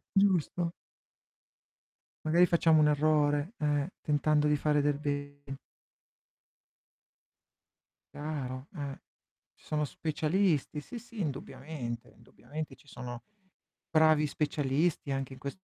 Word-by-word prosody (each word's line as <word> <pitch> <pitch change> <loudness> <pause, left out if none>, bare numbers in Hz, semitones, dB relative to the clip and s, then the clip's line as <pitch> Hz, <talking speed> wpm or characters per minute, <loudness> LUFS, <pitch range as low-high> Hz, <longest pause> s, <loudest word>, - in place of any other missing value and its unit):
Giusto. 180 -3 +3 1.5
Magari 170 +3 +5
facciamo 160 -2 +4
un 150 - +6
errore, 150 +3 +2
eh, 145 +1 +1
tentando 150 0 +2
di 150 - +4
fare 150 0 +2
del 145 0 +1
be 145 -1 -3 2.7
Chiaro, 140 -3 -4
eh. 140 -3 -5 0.6
Ci - - -23
sono 150 -1 0
specialisti, 155 +1 0
sì, 240 - -8
sì, 230 -1 -11
indubbiamente, 135 -4 -5
indubbiamente 150 +8 -8
ci 145 - -24
sono 120 -2 -7 0.7
bravi 155 -1 +5
specialisti 145 +1 0
anche 135 0 -3
in - - -13
ques 140 +5 -5
150 Hz, 105 wpm, -31 LUFS, 140-155 Hz, 2.7 s, un